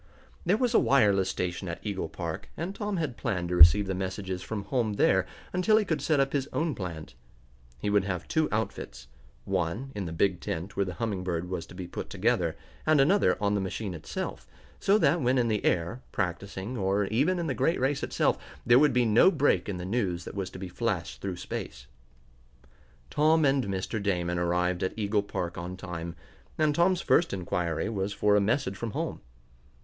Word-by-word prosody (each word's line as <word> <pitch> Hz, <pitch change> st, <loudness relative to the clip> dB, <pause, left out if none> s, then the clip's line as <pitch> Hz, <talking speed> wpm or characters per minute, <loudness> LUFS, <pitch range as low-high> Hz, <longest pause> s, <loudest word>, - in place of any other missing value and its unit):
There 195 Hz, +4 st, +4 dB
was 245 Hz, 0 st, +1 dB
a -, -, +6 dB
wireless 100 Hz, -8 st, +3 dB
station 90 Hz, 0 st, -3 dB
at 85 Hz, -, -4 dB
Eagle 100 Hz, -5 st, -3 dB
Park, 85 Hz, +3 st, -5 dB
and 170 Hz, +5 st, -3 dB
Tom 205 Hz, -1 st, -3 dB
had 150 Hz, -8 st, -2 dB
planned 85 Hz, -3 st, -2 dB
to 90 Hz, -, 0 dB
receive 85 Hz, +4 st, +8 dB
the 95 Hz, -, -2 dB
messages 95 Hz, 0 st, -4 dB
from 105 Hz, -1 st, -4 dB
home 110 Hz, 0 st, 0 dB
there -, -, +3 dB, 0.3 s
until 185 Hz, +4 st, +4 dB
he 215 Hz, -, +2 dB
could 160 Hz, -6 st, -1 dB
set 150 Hz, 0 st, +2 dB
up 135 Hz, 0 st, +1 dB
his 140 Hz, -1 st, 0 dB
own 160 Hz, -1 st, 0 dB
plant. 80 Hz, -, -6 dB, 0.6 s
He 100 Hz, +10 st, -2 dB
would 100 Hz, -1 st, +3 dB
have 90 Hz, -3 st, -3 dB
two 160 Hz, -2 st, +1 dB
outfits. 60 Hz, -, -3 dB, 0.4 s
One 105 Hz, +12 st, -2 dB
in 100 Hz, -2 st, -4 dB
the -, -, -5 dB
big 90 Hz, +2 st, +1 dB
tent 85 Hz, +5 st, -4 dB
where 100 Hz, -, +1 dB
the 90 Hz, -, -5 dB
Humming 105 Hz, -6 st, -2 dB
Bird 90 Hz, -1 st, -2 dB
was 85 Hz, -3 st, -3 dB
to -, -, -13 dB
be 90 Hz, -1 st, -5 dB
put 85 Hz, -, -6 dB
together, 95 Hz, -5 st, 0 dB, 0.3 s
and 155 Hz, -1 st, +4 dB
another 185 Hz, +9 st, +4 dB
on 105 Hz, -1 st, +1 dB
the 100 Hz, -, +1 dB
machine 95 Hz, +1 st, -4 dB
itself, 80 Hz, -2 st, -5 dB, 0.3 s
so 200 Hz, +1 st, +4 dB
that 165 Hz, -3 st, +3 dB
when 130 Hz, +1 st, +2 dB
in 120 Hz, -2 st, +2 dB
the 105 Hz, -2 st, 0 dB
air, 85 Hz, +9 st, 0 dB
practicing, 95 Hz, +6 st, -3 dB
or 100 Hz, +1 st, +1 dB
even 140 Hz, -, +1 dB
in 170 Hz, -, -2 dB
the 140 Hz, -, -1 dB
great 135 Hz, +7 st, +1 dB
race 135 Hz, +2 st, +1 dB
itself, -, -, +1 dB, 0.3 s
there 120 Hz, +1 st, +7 dB
would 145 Hz, -2 st, +4 dB
be 125 Hz, -1 st, +3 dB
no 115 Hz, -, +6 dB
break 140 Hz, -, +2 dB
in 95 Hz, -, -3 dB
the 90 Hz, -, -5 dB
news 95 Hz, -5 st, -1 dB
that -, -, -7 dB
was 95 Hz, -2 st, -3 dB
to -, -, -10 dB
be 95 Hz, 0 st, -6 dB
flashed 95 Hz, -2 st, -3 dB
through 95 Hz, -2 st, -3 dB
space. 65 Hz, -7 st, -6 dB, 1.3 s
Tom 155 Hz, +1 st, +4 dB
and 135 Hz, -2 st, +2 dB
Mr. 100 Hz, +2 st, -3 dB
Damon 90 Hz, -3 st, 0 dB
arrived 90 Hz, +1 st, 0 dB
at 95 Hz, -, -2 dB
Eagle 105 Hz, -1 st, +1 dB
Park 90 Hz, -4 st, -4 dB
on 90 Hz, +2 st, -6 dB
time, 85 Hz, -3 st, -6 dB, 0.4 s
and 155 Hz, -1 st, +3 dB
Tom's 175 Hz, +3 st, +3 dB
first 170 Hz, -, +3 dB
inquiry 90 Hz, -3 st, -1 dB
was 100 Hz, -3 st, -2 dB
for 105 Hz, 0 st, +3 dB
a 105 Hz, -, +4 dB
message 110 Hz, 0 st, 0 dB
from 115 Hz, +1 st, -5 dB
home. -, -, -3 dB
100 Hz, 205 wpm, -28 LUFS, 90-135 Hz, 1.3 s, receive